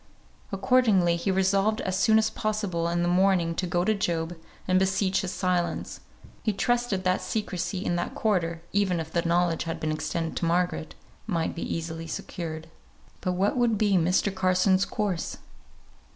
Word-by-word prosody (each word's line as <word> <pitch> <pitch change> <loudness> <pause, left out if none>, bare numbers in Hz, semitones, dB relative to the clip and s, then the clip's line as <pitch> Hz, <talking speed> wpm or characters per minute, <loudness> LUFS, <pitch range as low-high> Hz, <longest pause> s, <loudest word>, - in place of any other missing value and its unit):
Accordingly 195 -4 +3
he 170 +4 -2
resolved 195 +3 +2
as 185 - -2
soon 220 +3 +4
as 220 0 +2
possible 210 -6 -1
in 175 0 0
the - - +1
morning 180 -2 +3
to 180 +2 -2
go 175 +1 +1
to 220 - +2
Job 170 -4 -1 0.3
and 185 0 +4
beseech 190 0 +1
his 185 - -3
silence; 180 -2 -1 0.4
he 215 - 0
trusted 240 -2 0
that 185 0 +1
secrecy 195 -3 -3
in 175 - 0
that 175 - -3
quarter, 170 -6 0
even 195 -4 +2
if 160 -1 -5
the 170 - +2
knowledge 170 -1 +1
had 165 - -4
been 155 - -1
extended 165 +1 -3
to - - -1
Margaret, 170 -2 0 0.3
might 170 -6 -1
be 170 - -6
easily 165 0 -4
secured. 160 -1 -5 0.5
But 180 -1 -1
what 190 +3 +1
would 235 -3 +2
be 205 0 +2
Mr. 180 +2 +2
Carson's 185 0 +3
course? 200 -5 -2
185 Hz, 165 wpm, -27 LUFS, 170-200 Hz, 0.5 s, soon